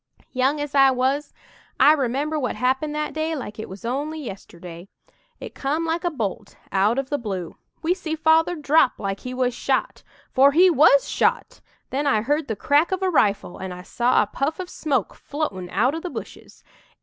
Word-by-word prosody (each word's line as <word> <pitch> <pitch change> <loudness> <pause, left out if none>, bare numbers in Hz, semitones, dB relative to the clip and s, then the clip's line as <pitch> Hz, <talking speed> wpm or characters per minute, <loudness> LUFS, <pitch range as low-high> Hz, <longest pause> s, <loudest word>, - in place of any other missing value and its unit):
"Young 265 +3 +1
as 290 -1 -4
I 270 -1 +6
was, 265 +3 0 0.5
I 295 - +7
remember 290 +2 -1
what 255 - -2
happened 265 +4 0
that 300 -1 -3
day 315 +1 -2
like 220 -7 -7
it 220 - -6
was 190 +4 -10
only 290 +6 -3
yesterday. 180 - -9 0.5
It - - -8
come 300 +4 -2
like 330 +2 -1
a 350 - +1
bolt 225 - -5
out 200 +5 +2
of 270 0 -3
the 290 - 0
blue. 190 -7 -5 0.3
We 335 +3 +2
see 335 -4 -4
Father 320 +2 +3
drop 300 -3 +3
like 195 -1 -3
he 255 0 -7
was 250 -1 0
shot - - -1 0.3
for 275 +1 +5
he 360 +4 +6
was 280 -2 +5
shot! - - 0 0.3
Then 285 +2 -1
I 220 -6 +2
heard 295 +4 0
the 220 - -2
crack 290 - +2
of 375 0 -1
a 375 - +1
rifle 205 - +1
and 190 -1 -5
I 180 - -10
saw 240 +3 +2
a - - -3
puff 275 - -3
of 365 -1 -6
smoke 270 - -1
floatin' 200 - -5
out 235 +10 +1
o' 325 - -3
the 360 - -6
bushes. - - -10
275 Hz, 195 wpm, -23 LUFS, 230-310 Hz, 0.5 s, I